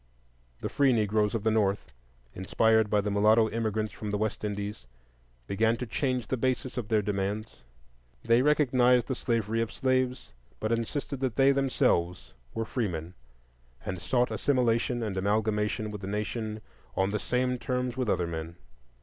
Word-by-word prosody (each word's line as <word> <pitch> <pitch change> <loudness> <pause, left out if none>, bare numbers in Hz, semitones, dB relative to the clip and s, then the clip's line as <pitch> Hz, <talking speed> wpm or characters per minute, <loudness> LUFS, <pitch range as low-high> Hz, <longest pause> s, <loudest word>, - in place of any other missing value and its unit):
The - - -2
free 140 -2 +3
Negroes 105 -1 +1
of 110 - -2
the 110 - +2
North, 105 -2 0 0.4
inspired 110 +3 +2
by 105 0 +3
the 105 +1 -2
mulatto 110 +2 +4
immigrants 110 -1 -1
from 105 - -6
the 105 - 0
West 110 0 -2
Indies, 100 - -4 0.6
began 110 - +1
to 125 - -4
change 125 +1 -1
the 130 - -2
basis 130 +1 -1
of 120 -5 -3
their 110 -1 +2
demands; 100 +2 -2 0.7
they 115 +1 +5
recognized 125 -4 +4
the 130 - -2
slavery 115 -2 -1
of 115 - -2
slaves, 130 -1 -1 0.3
but 110 - -2
insisted 130 +4 -2
that 130 -4 -1
they 135 0 +5
themselves 95 -10 +1 0.2
were 115 - -1
freemen, 90 -8 -3 0.7
and 90 -1 -4
sought 125 +5 +1
assimilation 120 -2 +1
and 100 -3 -3
amalgamation 105 +1 0
with 105 -2 -7
the 95 - -5
nation 105 +1 -3 0.3
on 95 +1 +1
the 105 - -1
same 125 +2 0
terms 125 -1 -2
with 130 -4 -1
other 90 -3 +1
men. 80 0 -5
110 Hz, 160 wpm, -28 LUFS, 105-125 Hz, 0.7 s, they